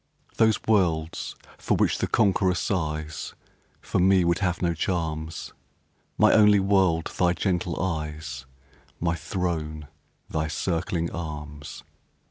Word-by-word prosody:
Those 110 -2 +4
worlds 85 -7 +1 0.2
for - - +1
which - - +2
the - - 0
conqueror 95 -4 +2
sighs 80 -4 -3 0.5
For - - -1
me 95 0 +4
would 85 0 +2
have 90 -3 0
no 85 -2 +1
charms; 80 -2 -3 0.6
My - - +5
only 105 -1 +6
world 95 -4 +2
thy 90 -1 +4
gentle 90 -1 -1
eyes 75 -6 -4 0.5
My 85 0 +1
throne 80 -5 -3 0.4
thy 80 0 -1
circling 85 +1 -1
arms! 75 -3 -7
85 Hz, 115 wpm, -26 LUFS, 80-95 Hz, 0.6 s, only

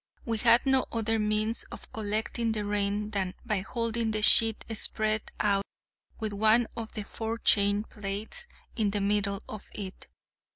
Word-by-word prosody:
We 225 -2 -1
had 235 +2 +5
no 265 -1 +4
other 225 -1 0
means 215 +2 +1
of - - -11
collecting 220 +2 -1
the 210 -1 -2
rain 205 +1 0
than 190 -3 -1
by 215 -4 +1
holding 230 +3 -2
the 215 -1 -1
sheet 225 0 +5
spread 215 0 0
out 200 -1 +2 0.6
with 215 -2 -2
one 220 +3 +4
of 225 -1 -6
the 215 - -3
forechain 210 -2 +1
plates 210 - -5 0.3
in 215 -4 +1
the 205 0 0
middle 200 0 0
of 215 - -9
it. 195 -2 -7
215 Hz, 155 wpm, -28 LUFS, 205-225 Hz, 0.6 s, had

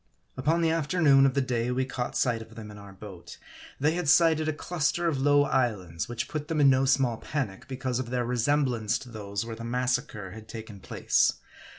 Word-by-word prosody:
Upon 155 +6 +1
the 165 - +3
afternoon 150 -4 +4
of 135 - -2
the 140 - +2
day 120 -2 -1
we 130 +1 0
caught 125 -1 -4
sight 120 -3 +1
of 110 0 -12
them 110 -2 -9
in 105 - -11
our 100 -1 -12
boat, 95 -2 -11 0.4
they 150 +3 +3
had 175 -4 -1
sighted 160 -1 +4
a - - +2
cluster 170 +2 -1
of 140 -5 0
low 145 +1 +5
islands, 105 - -1
which 120 -1 -3
put 150 -2 -5
them 160 -2 -1
in 140 -2 +6
no 130 +1 +3
small 130 -4 +2
panic, 125 -10 -4
because 130 -1 -3
of 125 -2 -4
their 125 -1 -1
resem 125 +5 +1
blance 115 -4 -1
to 130 - -11
those 100 -2 -5
where 115 -1 -6
the 115 - -9
massacre 125 -4 -2
had 110 +2 -11
taken 110 -3 -9
place. - - +1
125 Hz, 215 wpm, -27 LUFS, 115-145 Hz, 0.4 s, in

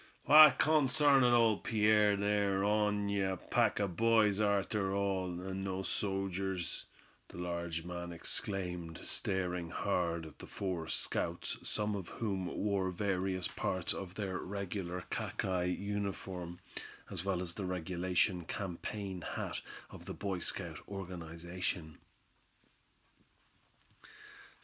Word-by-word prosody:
"Why, 150 0 +10
consarn 145 -2 +5
it 125 - +6
all, 115 -3 +5
Pierre, 105 -2 +4
they're 100 -1 +2
on'y 105 -1 +2
a 95 -1 0
pack - - +1
o' 100 - +2
boys 110 +1 +3
arter 100 -1 +1
all, 95 -3 0
and 95 +1 -4
not 95 0 -2
sojers," 95 -2 -1 0.4
the - - -12
larger 85 -1 -3
man 85 0 -5
exclaimed, 90 -1 -4
staring 90 -3 -1
hard 85 0 0
at 80 - -12
the - - -9
four 90 -5 -3
scouts, 85 +1 -2
some 105 -1 -1
of 95 -4 -5
whom 95 -5 -2
wore 100 -2 0
various 95 -1 0
parts 95 -2 -1
of 95 -1 -6
their 95 -3 -2
regular 95 -2 -4
khaki 90 -1 -1
uniforms, 95 -3 -3 0.5
as 85 - -3
well 95 -2 0
as 90 -2 -2
the 100 - -4
regulation 90 0 0
campaign 95 0 -4
hat - - -4 0.3
of - - -10
the - - -5
Boy 100 -3 -2
Scout - - -2
organization. 85 -3 -5
95 Hz, 120 wpm, -34 LUFS, 90-100 Hz, 0.5 s, Why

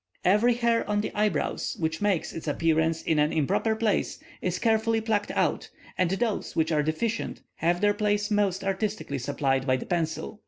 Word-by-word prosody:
Every 210 +6 +4
hair 235 -1 +2
on 205 0 +1
the - - -3
eyebrows 210 0 -1
which 160 +1 -2
makes 200 -5 0
its 165 - -7
appearance 160 +1 +1
in 160 -2 +1
an 150 +1 +3
improper 160 +8 +1
place, 220 -2 0 0.2
is 180 0 -1
carefully 225 +1 +2
plucked 215 -2 -1
out, - - 0 0.3
and 185 -2 +1
those 210 +3 -1
which 160 0 +1
are 150 -1 +3
deficient 185 +10 -2
have 175 +2 +1
their 205 0 +4
place 210 0 0
most 200 -2 +1
artistically 195 -7 -2
supplied 135 0 0
by 130 - +4
the - - -7
pencil. 170 +4 -2
195 Hz, 180 wpm, -27 LUFS, 160-215 Hz, 0.3 s, Every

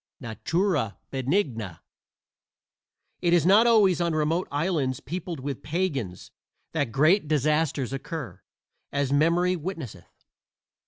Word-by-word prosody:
NATURA 120 - -1
BENIGNA 130 - -1 1.4
It 175 -1 +2
is 170 -3 +4
not 210 +6 +6
always 200 -7 +4
on 170 -2 0
remote 160 +4 0
islands 145 -4 0
peopled 170 0 -5
with 140 +1 -5
pagans 140 - -3 0.4
that 145 -7 -1
great 155 - +3
disasters 150 -2 +1
occur, 140 0 -6 0.5
as 140 -1 0
memory 170 +5 +3
witnesseth. 155 - -7
155 Hz, 105 wpm, -26 LUFS, 135-175 Hz, 1.4 s, not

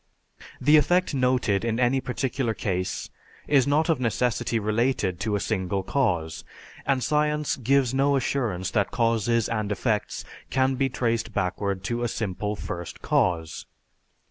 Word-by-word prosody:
The 150 +1 +6
effect 175 +3 +2
noted 125 -6 +1
in 115 0 -1
any 130 +2 +2
particular 125 -2 -2
case 90 -2 -3 0.4
is 140 -2 +4
not 150 +3 +2
of 160 -5 +2
necessity 120 0 0
related 110 -3 0
to 105 +1 -1
a - - 0
single 95 -2 -1
cause, 90 - -1 0.4
and 135 -2 +2
science 150 +1 +1
gives 130 0 +2
no 140 +1 +3
assurance 120 -8 -1
that 100 -2 +1
causes 115 -1 +1
and 110 -2 -2
effects 105 0 -1 0.2
can 130 0 +2
be 135 +1 0
traced 115 -3 -1
backward 95 0 -1
to 120 +4 -2
a 120 - +1
simple 105 -2 -3
First 85 -4 -7
Cause. 80 -3 0
115 Hz, 145 wpm, -25 LUFS, 100-135 Hz, 0.4 s, The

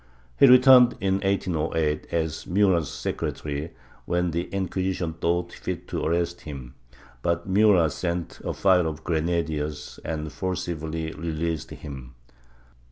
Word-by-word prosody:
He - - +8
returned, 125 -1 +8
in 95 0 +1
1808, 80 -6 0
as 80 -2 -2
Murat's 90 -4 +2
secretary, 75 +2 -4 0.4
when 90 0 0
the 85 +2 -1
Inquisition 95 -3 -2
thought 85 +1 -1
fit - - -5
to - - -3
arrest 85 +1 0
him, 65 -5 -8 0.5
but 85 +4 -1
Murat 95 -5 +4
sent 85 -2 -3
a - - -2
file 90 -3 +4
of 80 -1 -5
grenadiers 80 -3 -2
and 75 -1 -4
forcibly 80 -2 -3
released 80 -1 -3
him. 65 -4 -9
85 Hz, 120 wpm, -25 LUFS, 80-90 Hz, 0.5 s, He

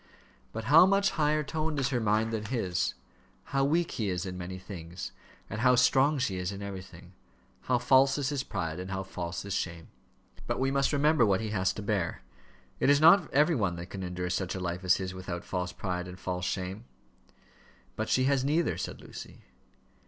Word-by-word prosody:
"But 115 - -5
how 155 +9 +7
much 195 0 +3
higher 150 0 +1
toned 155 +1 -2
is 135 -1 +1
her 125 -3 0
mind 110 +1 +1
than 110 -1 -2
his! 95 -6 -1 0.5
How 135 0 0
weak 165 +5 +1
he 105 -4 -2
is 90 0 -2
in 90 -1 -5
many 90 +1 -6
things, 90 -2 -8 0.4
and 110 +1 -5
how 125 0 +5
strong 135 +4 +4
she 120 -8 -1
is 90 +1 -2
in 100 0 -7
everything! 95 -2 -9 0.6
How 125 - +4
false 135 +2 +4
is 140 -2 0
his 145 -3 -1
pride, 90 -9 -4
and 90 +1 -6
how 95 0 -3
false 85 -2 -5
his 100 -1 -4
shame!" 85 -2 -3 0.6
"But - - -1
we 135 +1 +1
must 140 0 +2
remember 150 -1 +3
what 100 -4 +3
he 110 -1 -3
has 95 -3 +1
to 105 - -6
bear. 100 - -1 0.6
It - - +3
is 145 0 +6
not 165 +2 +6
every 150 +5 +4
one 100 - 0
that 85 +1 -8
can 95 - -6
endure 90 0 -3
such 95 0 -2
a - - -3
life 90 0 -3
as 90 -1 +5
his 95 -1 -4
without 90 -2 -5
false 90 -1 -3
pride 90 -2 -4
and 90 0 -10
false 90 -1 -3
shame." 95 +5 -3 1.1
"But - - -3
she 130 - +3
has 135 0 +2
neither," 155 +4 +1
said - - -5
Lucy. - - -10
105 Hz, 205 wpm, -29 LUFS, 90-135 Hz, 1.1 s, how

